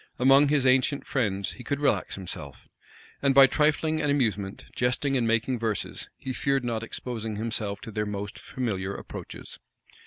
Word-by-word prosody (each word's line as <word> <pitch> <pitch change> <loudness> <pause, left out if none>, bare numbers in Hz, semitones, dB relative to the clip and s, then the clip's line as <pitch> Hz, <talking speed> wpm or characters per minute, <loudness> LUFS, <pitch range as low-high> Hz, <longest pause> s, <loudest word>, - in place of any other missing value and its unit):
Among 135 +3 +6
his 140 -2 +2
ancient 130 +2 +3
friends, 100 -8 -1
he 125 - -10
could 140 +2 -2
relax 145 - +1
himself; 95 -3 -6 0.5
and 140 -1 +3
by 135 -1 +10
trifling 155 +3 +2
and 150 - 0
amusement, 105 -8 0
jesting 125 +3 +1
and 120 -3 +2
making 115 +2 +1
verses, 110 -2 -3
he 130 - -5
feared 135 0 0
not 115 -2 -1
exposing 115 -1 -5
himself 110 -2 -2
to 115 - -8
their 105 0 -2
most 100 -1 -5
familiar 100 -7 -3
approaches. - - -8
125 Hz, 160 wpm, -27 LUFS, 105-135 Hz, 0.5 s, by